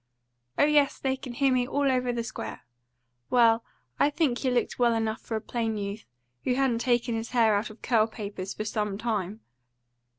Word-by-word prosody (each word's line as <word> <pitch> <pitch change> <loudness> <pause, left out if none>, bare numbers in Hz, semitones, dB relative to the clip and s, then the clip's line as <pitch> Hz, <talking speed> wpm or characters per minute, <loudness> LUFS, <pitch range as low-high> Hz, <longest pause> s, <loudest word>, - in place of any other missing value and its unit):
"Oh - - +5
yes, 295 -2 +3
they 265 -1 0
can 260 -2 -8
hear 270 +2 +2
me 250 -1 +1
all 280 0 +1
over 250 -1 +1
the 235 -1 -2
square. 220 -1 -6 0.7
Well, 230 -2 +4 0.4
I 285 - +5
think 295 -5 0
he 265 - 0
looked 245 0 0
well 240 -1 +4
enough 225 -1 -1
for 225 - -4
a 220 - -2
plain 225 -2 -2
youth, 200 +1 -5 0.4
who 250 - +1
hadn't 260 -3 +1
taken 240 0 +1
his 225 +1 -3
hair 230 -3 +4
out 205 +2 0
of 215 - -14
curl 225 -3 +3
papers 200 -4 -6
for 215 - -4
some 210 -2 -2
time." 215 -2 -2
235 Hz, 195 wpm, -27 LUFS, 220-255 Hz, 0.7 s, Oh